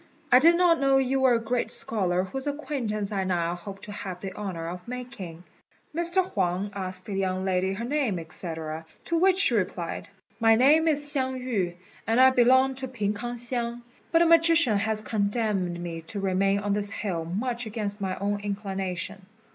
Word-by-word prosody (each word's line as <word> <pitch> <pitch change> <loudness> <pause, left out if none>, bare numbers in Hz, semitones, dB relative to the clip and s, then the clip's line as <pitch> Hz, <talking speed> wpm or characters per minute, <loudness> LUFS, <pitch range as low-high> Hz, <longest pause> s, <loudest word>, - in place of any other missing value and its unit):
I 250 - +8
did 335 +5 +6
not 345 -2 +4
know 275 -1 +4
you 270 0 +1
were 260 -2 +4
a - - +1
great 235 +2 -1
scholar 185 -5 +1
whose 265 +9 -5
acquaintance 250 -9 -3
I 195 -2 -1
now 175 -2 0
hope 195 +3 -9
to 210 - -7
have 190 -3 -6
the 190 0 -6
honour 180 -5 -5
of 180 +3 -7
making." 235 -9 -7 0.5
Mr. 345 +3 +2
Huang 190 - -1
asked 185 -1 -5
the 205 - -5
young 190 -1 -1
lady 190 0 +1
her 225 +4 -4
name, 255 - 0
&c., 165 +3 -4 0.6
to 335 - 0
which 375 +1 +4
she 390 -10 +3
replied, 180 -5 -2 0.3
"My 225 -1 +5
name 295 +7 +5
is 295 -2 +2
Hsiang 260 -3 0
yü, 200 -9 -2 0.3
and 225 +2 +2
I 260 0 +8
belong 260 +2 +4
to 265 0 -4
P'ing 210 -5 -2
k'ang 240 +3 -5
hsiang; 240 0 -3 0.3
but 330 0 +5
a - - +3
magician 330 -9 +5
has 215 0 0
condemned 200 -5 -1
me 170 -1 -5
to 205 - -2
remain 195 +1 +1
on 205 0 0
this 205 0 -1
hill 190 -6 -3
much 235 +7 -3
against 210 -2 -3
my 190 -1 -1
own 205 +1 -1
inclination." 195 -2 -4
210 Hz, 185 wpm, -26 LUFS, 190-260 Hz, 0.6 s, I